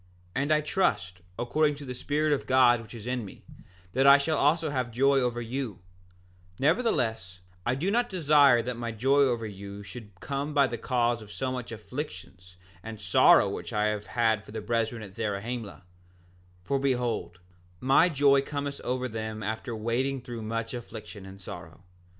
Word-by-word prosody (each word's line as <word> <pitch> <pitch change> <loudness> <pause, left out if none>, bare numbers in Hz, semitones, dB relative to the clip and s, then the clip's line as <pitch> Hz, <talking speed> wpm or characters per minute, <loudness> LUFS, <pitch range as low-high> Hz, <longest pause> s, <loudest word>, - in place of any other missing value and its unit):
7:5 135 - +1
And 145 +2 -1
I 155 0 +4
trust, 105 - 0 0.2
according 150 +5 +1
to 140 0 -9
the 125 - -5
Spirit 150 +4 0
of 140 - -2
God 125 -2 +5
which 110 +1 -12
is 110 -2 -9
in 125 -1 -2
me, 100 - -12 0.5
that 135 +2 +3
I 140 0 +10
shall 155 +3 0
also 155 +2 +2
have 130 -3 -1
joy 135 +4 +3
over 120 -2 -1
you; 120 -4 -4 0.8
nevertheless 120 - 0 0.3
I 125 - +2
do 175 +9 -1
not 240 +2 +1
desire 145 - +5
that 125 +1 -3
my 115 -1 -3
joy 135 +6 +2
over 120 -5 +2
you 100 0 -8
should 105 -4 -11
come 145 +2 -4
by 140 -1 +6
the 120 -3 -4
cause 120 -1 0
of 105 -1 -12
so 130 +3 -3
much 125 -2 -5
afflictions 100 - -8 0.2
and 110 +1 -8
sorrow 90 -3 +5
which - - -5
I 105 0 +1
have 105 -1 -4
had 110 -3 +1
for - - -13
the 110 - -4
brethren 115 0 -1
at 100 -2 -10
Zarahemla, 110 0 -4 0.8
for 140 +7 0
behold, 125 -9 -1 0.4
my 135 +7 +4
joy 140 -2 +4
cometh 140 0 -4
over 130 +1 -1
them 110 -1 -5
after 110 +2 -4
wading 125 +5 -1
through 120 -1 -7
much 115 +1 -3
affliction 110 -4 -8
and 95 0 -11
sorrow. 85 -1 -10
120 Hz, 180 wpm, -28 LUFS, 110-140 Hz, 0.8 s, I